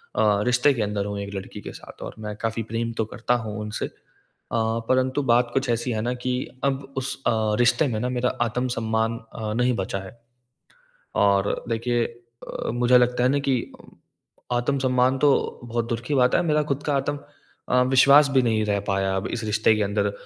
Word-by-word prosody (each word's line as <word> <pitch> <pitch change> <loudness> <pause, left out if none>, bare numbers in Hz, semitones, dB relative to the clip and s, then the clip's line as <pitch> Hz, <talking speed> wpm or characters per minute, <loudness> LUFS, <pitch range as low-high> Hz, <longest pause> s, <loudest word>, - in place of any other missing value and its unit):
अ, 105 -1 +3
रिश्ते 125 +3 +4
के 120 - -3
अंदर 105 -1 -1
हूँ 100 0 -4
एक 100 0 -6
लड़की 95 0 -7
के - - -7
साथ - - -13
और - - -7
मैं 105 -1 -5
काफ़ी 115 0 -1
प्रेम 115 0 -1
तो 110 - +1
करता 120 +1 0
हूँ 105 0 -5
उनसे 105 0 -3 0.7
अ, - - 0 0.3
परंतु 130 +2 +2
बात 120 0 +3
कुछ 135 -1 0
ऐसी 120 +1 0
है 110 -2 -1
ना 120 +3 -1
कि 125 - 0 0.3
अब 135 0 -2
उस 135 0 -2
अ, - - +4 0.3
रिश्ते 125 +5 +3
में 110 -4 -2
ना 125 +3 -1
मेरा 125 0 0
आत्मसम्मान 115 -1 0 0.2
अ, 110 -2 -3
नहीं 125 +2 +2
बचा 95 -1 -2
है। 95 +4 -11 1.1
और 100 0 +2
देखिए 120 +1 0
अ, 120 0 -8
मुझे 120 +1 +4
लगता 125 0 +2
है 125 - +4
ना 140 +1 +2
कि 130 - +3 1.0
आत्मसम्मान 130 0 +1
तो 145 - +5 0.3
बहुत 120 -1 -2
दूर 115 -2 -1
की 150 - -1
बात 125 -2 +4
है - - +4
मेरा 150 -2 +2
खुद 140 +2 -2
का 145 - 0
आतम 145 +1 -1 0.5
अ, 125 0 +4
विश्वास 140 +3 +6
भी 135 -1 +3
नहीं 110 -2 +1
रह 100 -1 +1
पाया 95 -1 0
अब 95 - -2
इस 120 - -4
रिश्ते 110 +1 +3
के 105 - +1
अंदर 100 0 0
120 Hz, 200 wpm, -24 LUFS, 110-130 Hz, 1.1 s, विश्वास